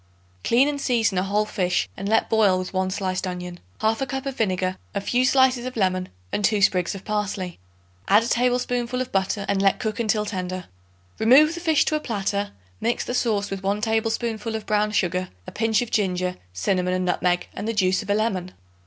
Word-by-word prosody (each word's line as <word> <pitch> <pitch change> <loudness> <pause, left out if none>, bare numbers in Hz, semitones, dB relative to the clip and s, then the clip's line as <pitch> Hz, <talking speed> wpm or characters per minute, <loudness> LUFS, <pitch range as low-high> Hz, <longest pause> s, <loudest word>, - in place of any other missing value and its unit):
Clean 250 +4 +4
and 290 -1 -2
season 225 -8 +1
a - - +1
whole 205 +3 +1
fish 180 -4 0
and 195 +1 -4
let 225 - +3
boil 210 -4 +3
with 185 +1 -5
1 185 0 0
sliced 185 0 -2
onion, 180 -1 -6 0.2
1/2 225 +5 +1
cup 270 +1 -3
of 275 -1 -3
vinegar, 185 -4 0 0.2
a - - +1
few 245 +5 +1
slices 255 -1 +3
of 255 - -7
lemon 185 -2 0 0.2
and 205 - -1
2 210 +1 +3
sprigs 185 -1 +2
of 195 - -9
parsley. 205 -4 -3 0.5
Add 210 +3 +5
a - - -3
tablespoonful 245 0 0
of 255 - -3
butter 195 +1 0
and 200 -1 +1
let 195 -1 +3
cook 220 -2 -3
until 215 -2 +1
tender. 185 -2 -4 0.5
Remove 275 +8 +6
the 345 - -6
fish 320 -3 +3
to 310 - +1
a - - +1
platter; 205 -5 -2 0.3
mix 235 - -1
the - - -3
sauce 215 -5 0
with 195 -1 -4
1 200 +2 0
tablespoonful 225 0 -1
of 220 - -5
brown 210 0 +1
sugar, 185 -2 0 0.2
a - - -8
pinch 225 0 +1
of 240 - -9
ginger, 180 -3 0 0.2
cinnamon 180 - 0
and 185 0 -1
nutmeg 180 0 +1
and 215 - -5
the 225 - 0
juice 185 -2 +2
of 205 - -10
a 205 - +3
lemon. 190 -4 -1
210 Hz, 205 wpm, -24 LUFS, 185-235 Hz, 0.5 s, Remove